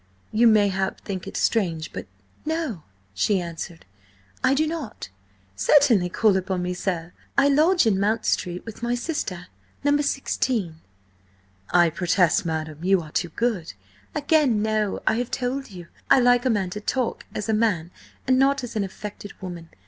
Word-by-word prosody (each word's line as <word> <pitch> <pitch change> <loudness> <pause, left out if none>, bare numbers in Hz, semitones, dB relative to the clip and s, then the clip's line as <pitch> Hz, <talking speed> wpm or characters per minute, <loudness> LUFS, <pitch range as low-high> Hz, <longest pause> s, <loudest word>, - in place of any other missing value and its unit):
You, 230 +2 +4
mayhap, 200 -3 +2
think 190 -3 -5
it - - -5
strange–but—" 165 - -1 0.4
"No," 315 - -2 0.3
she 190 - +2
answered. 170 -1 -7 0.6
"I 260 +1 +4
do 310 +3 +2
not. 310 - -5 0.5
Certainly 215 - +4
call 210 +2 +3
upon 185 -1 -2
me, 180 0 -2
sir. 175 -2 -3 0.2
I 280 0 +5
lodge 315 +4 +4
in 200 -4 +2
Mount 215 +3 +1
Street 180 -1 -1
with 225 -1 -9
my 240 +1 0
sister–No. 185 - -3
16." 240 - -1 0.9
"I 175 -2 +4
protest, 180 +3 +2
madam, 155 -1 -4
you 190 +1 +4
are 155 -2 -11
too 175 - -1
good—" 210 - -2 0.4
"Again, 285 -7 +2
no. 215 -2 0
I 220 - +2
have 245 0 -2
told 265 +1 -2
you, 180 -4 -10 0.2
I - - +7
like 245 0 +4
a - - +3
man 195 -5 0
to 210 - -5
talk 250 +3 -2
as 210 - -3
a 220 - +1
man 195 -7 +1 0.3
and 255 0 +3
not 275 0 +3
as 240 -1 -6
an 210 - +1
affected 205 +1 -8
woman. 175 -3 -8
210 Hz, 160 wpm, -24 LUFS, 180-245 Hz, 0.9 s, I